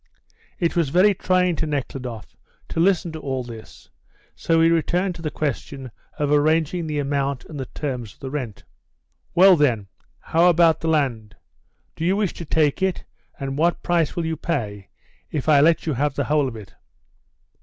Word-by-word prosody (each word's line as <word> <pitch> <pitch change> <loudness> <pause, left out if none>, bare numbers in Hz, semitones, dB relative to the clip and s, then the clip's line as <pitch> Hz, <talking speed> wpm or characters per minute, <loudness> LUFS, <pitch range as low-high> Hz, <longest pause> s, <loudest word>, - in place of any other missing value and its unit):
It 170 -2 0
was 165 -5 +1
very 185 +7 +4
trying 180 -1 +1
to 160 - -1
Nekhludoff 130 -5 -5 0.3
to - - -3
listen 175 -1 +2
to 160 - -7
all 130 -3 -3
this, 115 -2 -12 0.4
so 165 -1 +1
he 165 0 +5
returned 180 +3 +1
to 165 - -11
the 155 - -2
question 140 -3 -4 0.3
of 145 -1 0
arranging 160 +3 +2
the 150 -1 -3
amount 140 -2 -1
and 150 - -8
the 130 - -4
terms 125 -7 -5
of - - -34
the 135 - -6
rent. 125 -8 -5 0.7
"Well, 190 +1 +8
then, 120 - +1 0.3
how 170 +2 +3
about 170 -1 +4
the 165 - -2
land? 125 -10 0 0.6
Do 160 - -5
you 185 +3 +2
wish 205 -4 0
to 170 - -8
take 150 +1 +1
it, 190 -2 0 0.4
and 135 0 -4
what 170 +2 +1
price 170 -4 +1
will 170 - -2
you 160 0 -1
pay 105 - -3 0.4
if 150 -1 -4
I 150 -2 +6
let 165 +2 +3
you 155 - 0
have 140 +2 -1
the 140 - 0
whole 145 0 +1
of 120 - -6
it?" 105 -4 -11
150 Hz, 185 wpm, -22 LUFS, 135-170 Hz, 0.7 s, Well